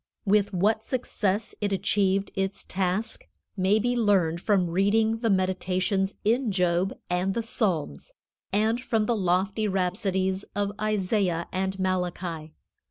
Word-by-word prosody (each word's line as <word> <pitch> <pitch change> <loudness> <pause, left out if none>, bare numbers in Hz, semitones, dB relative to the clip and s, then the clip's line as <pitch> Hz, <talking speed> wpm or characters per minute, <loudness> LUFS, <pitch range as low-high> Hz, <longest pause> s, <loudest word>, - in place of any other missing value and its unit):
With 205 0 +3
what 210 +4 +1
success 220 -4 -1
it 205 -1 0
achieved 195 0 +1
its 195 0 -2
task 190 +4 -2 0.3
may 195 +2 +3
be 245 +3 0
learned 190 -7 +2
from 185 -5 +2
reading 220 +5 +2
the 230 -1 0
meditations 190 +1 0
in 230 +1 +2
Job 180 0 +1
and 180 +2 0
the 235 - -1
Psalms, 200 - -2 0.4
and 220 +4 +1
from 225 -4 +1
the 235 - +1
lofty 195 +2 +1
rhapsodies 190 0 0
of 205 0 0
Isaiah 195 -4 0
and 190 +1 -2
Malachi. 180 -4 -2
195 Hz, 130 wpm, -26 LUFS, 185-215 Hz, 0.4 s, With